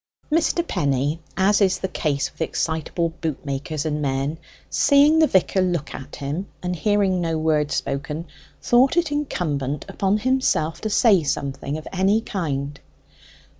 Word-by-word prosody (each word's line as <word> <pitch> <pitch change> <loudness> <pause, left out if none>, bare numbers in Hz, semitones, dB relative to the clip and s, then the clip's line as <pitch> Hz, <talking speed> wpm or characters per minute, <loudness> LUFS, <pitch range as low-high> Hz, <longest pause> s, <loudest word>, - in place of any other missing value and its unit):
Mr. 335 +2 +1
Penny, 140 +3 0 0.2
as 200 +2 +3
is 190 -2 +3
the 190 - -3
case 145 -6 -1
with - - -14
excitable 160 +1 -1
boot 155 -3 -3
makers 145 +2 -3
and 150 -1 -1
men, 140 +3 -1 0.3
seeing 290 +2 +4
the 315 - +5
vicar 190 -2 +2
look 175 -5 -1
at 135 +1 -8
him 150 +7 -4 0.2
and 180 0 -1
hearing 195 0 +1
no 165 -1 -1
word 155 -2 +1
spoken, 150 +4 -3 0.3
thought 260 +7 +3
it 335 -3 +2
incumbent 150 - -2
upon 195 +1 0
himself 215 -10 0
to 220 - -2
say 205 -3 +4
something 140 0 -3
of 155 - -9
any 195 +3 +3
kind. 145 -10 -3
165 Hz, 150 wpm, -23 LUFS, 145-205 Hz, 0.3 s, the